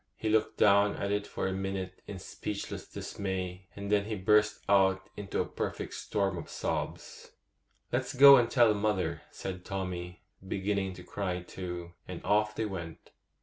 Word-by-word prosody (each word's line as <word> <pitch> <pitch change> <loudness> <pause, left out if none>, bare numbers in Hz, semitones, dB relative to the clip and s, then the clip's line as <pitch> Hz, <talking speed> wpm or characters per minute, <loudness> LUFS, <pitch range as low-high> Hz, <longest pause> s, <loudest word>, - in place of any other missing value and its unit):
He 110 - -2
looked 110 0 +2
down 100 0 +5
at 100 - -2
it 105 0 0
for - - -3
a 95 - -1
minute 95 -1 -4
in 100 - -6
speechless 100 +2 -5
dismay, 95 -1 -4
and 100 0 -5
then 100 -1 +3
he 110 0 -3
burst 105 +2 +3
out 95 -1 +4
into 100 -1 -3
a - - +2
perfect - - -4
storm 100 -4 -1
of - - -9
sobs. - - -4 0.6
'Let's - - -1
go 140 +1 +11
and 120 -2 +3
tell 120 -4 +5
mother,' 105 -2 0
said 90 -1 -6
Tommy, 90 -2 -5 0.2
beginning 95 0 -1
to 90 0 -11
cry 90 -3 -3
too; 90 -1 -6
and 90 -2 -6
off 105 +1 +2
they 110 - -1
went. 85 -5 -7
95 Hz, 165 wpm, -31 LUFS, 95-105 Hz, 0.6 s, go